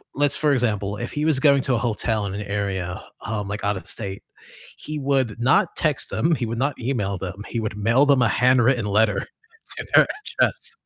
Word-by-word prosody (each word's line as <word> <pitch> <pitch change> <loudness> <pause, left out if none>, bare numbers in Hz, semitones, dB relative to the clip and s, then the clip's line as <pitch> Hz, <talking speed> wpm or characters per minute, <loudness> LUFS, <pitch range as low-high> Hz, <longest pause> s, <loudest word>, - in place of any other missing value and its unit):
Let's 145 0 +2
for 150 -2 +2
example, 105 -5 0
if 120 +3 -5
he 150 +1 -1
was 155 -5 +3
going 140 -2 +4
to 130 - +1
a - - +1
hotel 110 -2 -1
in 95 - -4
an 100 - -4
area, 100 -3 -3 0.2
um, 105 -2 -3
like 105 +1 -5
out 100 -1 0
of - - -9
state, 100 -3 -5 0.5
he 155 0 -6
would 135 -5 0
not 135 - +3
text 150 -4 0
them, 135 +11 +1
he 120 - -2
would 115 +1 -4
not 140 +1 -1
email 105 -6 -1
them, 95 +2 -6
he 115 - -3
would 105 -2 -4
mail 115 +7 +3
them 140 -3 +4
a 120 - +4
handwritten 125 -1 +3
letter 105 0 +2 0.6
to - - -5
their - - +7 0.3
address. 470 - +1
115 Hz, 210 wpm, -23 LUFS, 105-135 Hz, 0.6 s, their